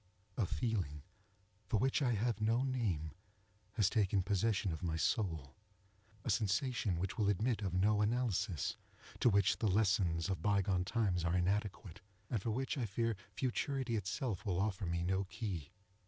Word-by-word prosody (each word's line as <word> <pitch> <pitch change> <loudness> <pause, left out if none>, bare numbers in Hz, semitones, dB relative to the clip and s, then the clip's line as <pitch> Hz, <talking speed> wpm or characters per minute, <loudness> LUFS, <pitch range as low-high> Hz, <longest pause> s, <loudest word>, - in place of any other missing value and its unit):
A 110 -7 0
feeling, 95 - -2 0.6
for 110 - +2
which 135 +7 +2
I 125 -3 +2
have 115 +1 0
no 115 +4 +2
name, 105 - -1 0.6
has 105 -5 +3
taken 100 -3 +2
possession 100 0 +1
of 80 - -5
my 85 -3 -1
soul 80 - 0 0.7
—a - - -1
sensation 110 - +1
which 95 +3 -3
will 105 -2 +3
admit 110 +4 +1
of 95 -3 -2
no 105 +3 +3
analysis, 105 - 0 0.4
to - - +5
which 100 -2 +3
the 110 - +2
lessons 95 -4 +2
of 95 -5 -2
bygone 95 -2 +2
times 95 -5 +1
are 85 +1 +1
inadequate, 100 +1 -1 0.3
and 115 -5 0
for 115 - -2
which 130 +5 -1
I 120 - -1
fear 115 +3 0 0.2
futurity 130 -1 -1
itself 105 - -2
will 95 -5 0
offer 100 -2 -1
me 85 0 -1
no 95 +2 0
key. 95 - -4
100 Hz, 160 wpm, -36 LUFS, 90-115 Hz, 0.7 s, to